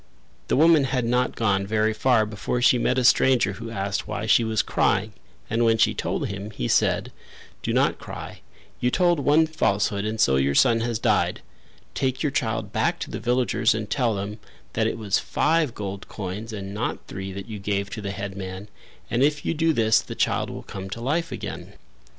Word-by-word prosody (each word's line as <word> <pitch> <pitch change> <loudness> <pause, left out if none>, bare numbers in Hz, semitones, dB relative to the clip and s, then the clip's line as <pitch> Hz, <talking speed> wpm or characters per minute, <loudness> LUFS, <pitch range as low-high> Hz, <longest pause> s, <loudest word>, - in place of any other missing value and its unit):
The - - +1
woman 155 -1 +5
had 130 -2 -1
not 125 +2 +1
gone 100 -3 +1
very 110 +1 +1
far 110 -1 +3
before 105 +3 -3
she 125 0 +4
met 125 +2 +1
a 130 - +2
stranger 125 -4 +4
who 115 +3 -7
asked 100 -3 -3
why 105 0 -3
she 110 +1 +4
was 110 -1 +1
crying 105 +3 +1 0.3
and 115 +2 0
when 115 -1 +4
she - - +3
told - - -2
him, 100 +1 -6
he 65 - -4
said: - - +1 0.5
"Do - - -2
not - - +2
cry: - - -8 0.4
you 125 - +2
told 175 +3 +2
one 150 +3 +4
falsehood 100 -9 0
and 110 +1 -3
so 65 -10 +4
your 70 +1 +1
son 115 -1 +5
has 115 0 -1
died. 105 -6 +1 0.5
Take 130 +1 -1
your 150 - +1
child 115 -4 -2
back - - +1
to - - -5
the - - -4
villagers 120 -2 +1
and 110 -1 -3
tell 120 -6 +1
them 100 +2 -5 0.3
that - - +1
it - - -2
was 105 -3 0
five 155 -4 +1
gold 100 -1 -6
coins 105 +3 -6
and 100 -2 -6
not 110 +4 -3
three 95 +1 -6
that 100 +2 -7
you 110 -2 -6
gave 100 0 -2
to 110 - -5
the 100 - -4
headman 95 0 -6 0.4
and 120 - +1
if 145 +1 +2
you - - +1
do 165 +1 +2
this 110 -6 +3
the - - -8
child - - 0
will - - -7
come 95 0 -7
to 100 - -6
life 155 +8 -1
again." - - -6
110 Hz, 205 wpm, -24 LUFS, 100-125 Hz, 0.5 s, woman